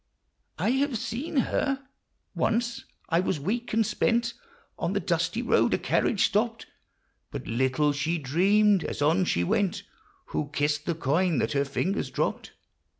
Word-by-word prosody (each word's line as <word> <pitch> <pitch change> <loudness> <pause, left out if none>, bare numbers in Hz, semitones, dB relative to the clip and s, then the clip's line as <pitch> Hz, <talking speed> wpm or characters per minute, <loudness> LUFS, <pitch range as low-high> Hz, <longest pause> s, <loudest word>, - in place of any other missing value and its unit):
I - - +1
have 265 -1 +1
seen 260 +10 -4
her? 270 +1 0 0.5
Once: 235 +1 -1 0.2
I 165 -1 +3
was 180 -3 0
weak 235 - -2
and 225 0 +2
spent 235 +3 +1 0.5
On - - -1
the - - +1
dusty - - -1
road; - - +3
a - - 0
carriage 210 - +2
stopped; 225 +2 0 0.6
But - - -6
little 130 +5 +1
she 155 +4 -1
dreamed, 190 +7 +3
as 145 - -3
on 165 +5 +3
she 85 - +1
went, 190 - 0 0.5
Who 145 - -1
kissed 145 +1 0
the 170 - 0
coin 165 +3 +1
that 110 - 0
her 140 0 +1
fingers 180 +8 -1
dropped - - -2
185 Hz, 150 wpm, -27 LUFS, 145-230 Hz, 0.6 s, I